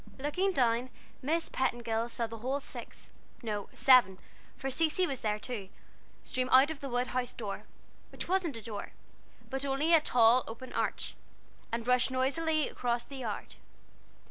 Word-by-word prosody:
Looking 300 +8 0
down, 245 -5 +2 0.3
Miss 325 +5 +1
Petingill 235 -3 -1
saw 235 0 -1
the 225 0 -8
whole 260 +5 -1
six - - -8 0.3
no, 210 -3 -3
seven, 250 -8 +6 0.4
for 270 - -3
Cecy 325 +5 +2
was 275 -7 -3
there 210 -1 0
too 210 -3 -5 0.5
stream 255 0 -2
out 265 +4 +7
of 310 - -6
the 275 - -5
wood 245 +1 0
house 250 -1 -2
door 210 -4 -5 0.5
which - - -7
wasn't 355 -8 0
a 225 - -9
door, 205 -2 -6 0.6
but 270 +1 -2
only 280 +4 +1
a 325 - +7
tall 245 -2 +5
open 245 +3 -8
arch - - -1 0.6
and 230 0 -2
rush 250 0 +4
noisily 300 +4 +1
across 240 -1 -1
the 275 - -9
yard. 230 -5 -5
255 Hz, 160 wpm, -31 LUFS, 230-280 Hz, 0.6 s, out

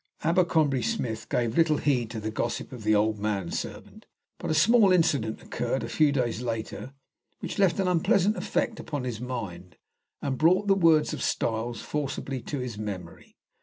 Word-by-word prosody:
Abercrombie 160 -5 +2
Smith 115 -1 -3
gave 120 -2 0
little 160 -2 +4
heed 125 -7 +1
to 115 -1 -5
the 110 +1 -4
gossip 115 +2 -3
of 125 -3 -8
the 110 0 +3
old 105 0 +1
man 100 -4 -2
servant, - - -6 0.3
but - - -4
a 155 - +1
small 210 +4 +5
incident 140 -11 +1
occurred - - -2
a - - -3
few 150 -2 +3
days 125 -4 -1
later 120 +3 -5 0.4
which - - -5
left 195 -1 +3
an 190 - +1
unpleasant 180 +4 +3
effect 230 0 -1
upon 145 -4 -4
his 120 -3 -4
mind, 95 -8 -6 0.4
and 135 -3 -3
brought 185 +6 +4
the 200 - +4
words 165 -5 +4
of - - -5
Styles 115 0 -1
forcibly 135 -3 -3
to 145 - -5
his 125 -5 -5
memory. 95 -5 -7
130 Hz, 175 wpm, -27 LUFS, 110-160 Hz, 0.4 s, small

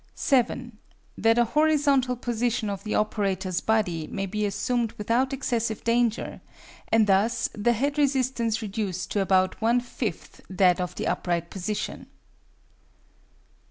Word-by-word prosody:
7. 245 -3 0 0.4
That 225 +1 +3
a 240 - +4
horizontal 285 -2 +2
position 235 -2 -1
of 200 - -6
the 215 - -2
operator's 190 -4 0
body 180 -8 0
may 195 -1 -3
be 210 +2 -1
assumed 225 +3 -1
without 235 +6 0
excessive 235 -5 -2
danger, 235 -1 0 0.5
and 225 -1 +5
thus 200 +4 +2
the 225 +3 +1
head 285 +6 -1
resistance 255 -5 +1
reduced 195 -3 -3
to 205 - +1
about 185 0 +2
one 235 +2 +3
fifth 235 -6 -5
that 185 -1 +3
of 180 - -4
the - - -3
upright 170 -1 -1
position. 205 +2 -4
220 Hz, 130 wpm, -26 LUFS, 195-245 Hz, 0.5 s, and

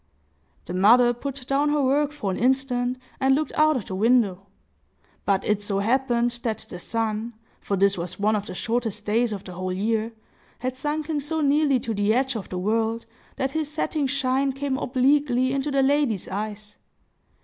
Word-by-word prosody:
The 175 - -6
mother 240 +6 +5
put 265 +1 -6
down 280 +3 +1
her 295 -1 +2
work 285 +2 +2
for 250 -10 -3
an 185 - -3
instant, 250 0 +1 0.2
and 265 0 +4
looked 305 +2 -1
out 310 0 +4
of 215 - -5
the - - -6
window. 200 -2 +2 0.8
But 195 -1 +1
it 210 -1 +1
so 205 -1 -2
happened 240 +2 +1
that 225 -4 -3
the 180 - -7
sun—for 225 -1 -3
this 195 -1 +3
was 180 +2 -6
one 215 +2 +2
of 205 0 -3
the - - -7
shortest 225 -1 -2
days 230 +2 +1
of 200 -2 -5
the 180 - -9
whole 185 +1 -3
year—had 225 +5 -4
sunken 300 +2 -2
so 315 +3 -2
nearly 285 -2 +3
to 230 - -3
the 205 +1 +2
edge 265 0 +1
of 215 - -5
the 185 - -4
world 225 +4 0 0.3
that 265 0 -1
his 315 -1 -2
setting 305 -1 -1
shine 270 0 0
came 275 0 -2
obliquely 260 0 +2
into 275 +1 -1
the 275 -1 +2
lady's 270 -8 +1
eyes. 210 +1 -5
240 Hz, 180 wpm, -24 LUFS, 210-275 Hz, 0.8 s, mother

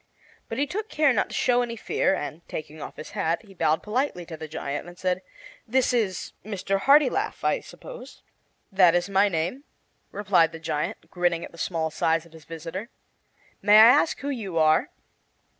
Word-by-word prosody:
But - - -4
he 285 - +2
took 425 +8 -5
care 300 -3 +3
not 210 - +1
to - - -6
show 245 -1 +3
any 235 -1 -3
fear, 220 - 0
and, 150 +1 -6
taking 155 0 -7
off - - -8
his 155 - -9
hat, 165 +5 -1
he 195 - -15
bowed 160 -3 +1
politely 215 -5 -2
to 165 - -8
the 155 0 -8
giant 145 0 -5
and 175 0 -12
said: 185 0 -1 0.5
"This 255 +2 +2
is 210 -7 -1
Mr. 195 -1 -2
Hartilaf, 295 - +3
I - - +2
suppose?" - - -12 0.5
"That 180 -3 +5
is 175 +2 0
my 200 +1 +4
name," 180 - -2 0.5
replied 195 -5 +2
the 160 - -7
giant, 160 +1 -4
grinning 175 -2 0
at - - -13
the 170 - -14
small 160 -2 -1
size 165 +1 0
of 165 - -19
his 160 -2 -14
visitor. 165 +7 -7 0.7
"May 205 +2 +6
I 220 - +10
ask 295 +5 +4
who 285 - -3
you 210 -11 -4
are?" 155 0 +3
185 Hz, 190 wpm, -25 LUFS, 165-235 Hz, 0.7 s, I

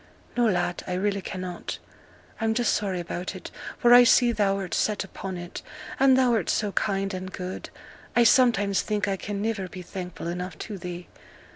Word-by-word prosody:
'No, 240 -1 +3
lad, 175 -3 0
I 180 - -2
really 200 +2 0
cannot. 185 -1 -5 0.6
I'm 225 -1 +1
just 240 -1 +2
sorry 195 -3 -1
about 175 +1 -4
it, - - -8 0.3
for 240 -2 +5
I 245 0 +10
see 245 0 +5
thou'rt 195 -3 0
set 210 -2 +1
upon 190 -1 -6
it; 175 +1 -7 0.4
and 265 -1 +6
thou'rt 240 -8 +2
so 210 -2 +1
kind 195 -1 0
and 185 0 -5
good, 185 0 -6 0.5
I 240 - +6
sometimes 220 -5 +4
think 210 -2 -1
I 195 - +1
can 200 +1 -4
niver 215 -4 -1
be 180 0 -9
thankful 180 -1 -7
enough 180 +2 -4
to 205 -4 -6
thee. 175 0 -6
195 Hz, 175 wpm, -26 LUFS, 185-220 Hz, 0.6 s, I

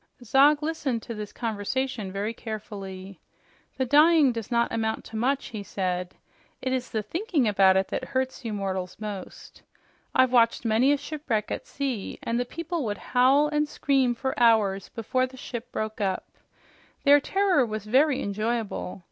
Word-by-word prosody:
Zog 285 +5 +4
listened 290 -7 -2
to 235 - -6
this 210 -2 -6
conversation 225 -1 -3
very 205 +3 -2
carefully. 195 -4 -7 0.6
"The 260 - +1
dying 300 +1 +5
does 230 -2 -5
not 235 -1 +1
amount 220 -1 -1
to 220 - -10
much," 260 +5 0
he 215 -3 -6
said. 180 -2 -3 0.4
"It 260 0 -2
is 255 -1 -2
the 220 -2 -2
thinking 325 - 0
about 190 -2 +5
it 190 - 0
that - - -3
hurts 260 0 -2
you 230 - -3
mortals 190 -3 -3
most. 205 -3 -8 0.5
I've 260 -1 +5
watched 235 -1 +3
many 230 +5 +4
a 290 - +3
shipwreck 285 -7 -3
at - - -4
sea, 265 -8 -3
and 235 +1 -1
the 245 - 0
people 335 +3 -4
would 210 -3 -2 0.2
howl 265 +4 +5
and 300 0 0
scream 270 -5 +1
for 265 +2 -2
hours 215 -5 +3
before 255 +3 -1
the 260 0 -14
ship 240 -1 -7
broke 215 0 -4
up. 190 -2 -1 0.8
Their 285 0 +7
terror 380 -2 +2
was 215 -3 -4
very 265 +5 +3
enjoyable. 215 -2 -3
235 Hz, 165 wpm, -26 LUFS, 210-270 Hz, 0.8 s, Their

